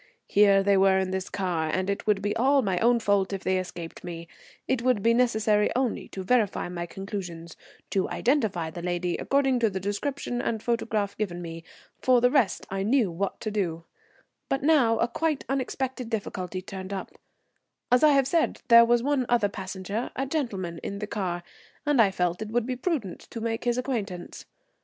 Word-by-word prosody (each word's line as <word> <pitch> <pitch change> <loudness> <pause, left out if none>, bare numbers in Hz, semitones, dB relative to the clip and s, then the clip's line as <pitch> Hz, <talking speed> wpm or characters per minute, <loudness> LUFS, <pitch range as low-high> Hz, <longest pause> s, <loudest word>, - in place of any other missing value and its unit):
Here 200 -1 +5
they 200 0 +4
were 190 0 +5
in 190 -1 0
this 190 0 -3
car, 175 -5 -1
and 185 +2 -1
it 200 +1 -3
would 205 -2 +2
be 205 - 0
all 270 +3 +3
my 190 -4 0
own 235 +1 +4
fault 200 -3 +1
if 195 - -4
they 185 0 +1
escaped 175 -2 -7
me. 170 -1 -7 0.4
It 260 -3 +1
would 245 -5 +1
be 230 - +4
necessary 220 -3 +2
only 255 -2 -1
to 190 - -7
verify 215 -4 +1
my 175 -1 -4
conclusions, 180 -4 -6 0.4
to 195 - 0
identify 220 - 0
the 175 - -7
lady 175 0 -1
according 270 -2 +2
to 230 -2 +3
the 190 -1 -4
description 245 +5 -3
and 220 -2 -2
photograph 220 -4 -1
given 180 -5 -2
me. 165 -1 -7 0.4
For 255 -1 +5
the 245 +1 +3
rest 255 - +2
I 195 0 -2
knew 220 -1 +2
what 190 +4 -3
to 215 - -3
do. 170 -6 -2 0.7
But 270 0 0
now 270 -7 +4
a 235 - +2
quite 305 +4 -1
unexpected 260 -2 -2
difficulty 185 -4 -4
turned 190 0 -7
up. 195 - -5 0.8
As 250 - +5
I 305 - +8
have 275 -1 +4
said, 330 +4 0
there 235 0 +9
was 240 0 +3
one 275 -3 +1
other 235 -4 +3
passenger, 195 +3 -4
a 270 - -1
gentleman, 200 - -3
in 200 - -5
the 210 - -4
car, 185 -5 -3 0.4
and 290 -5 +4
I 205 - +5
felt 180 0 -1
it 215 - -4
would 235 +1 0
be 255 0 -2
prudent 250 - -2
to 230 - -6
make 225 +1 -3
his 240 0 +1
acquaintance. 220 -9 -4
210 Hz, 195 wpm, -27 LUFS, 185-245 Hz, 0.8 s, there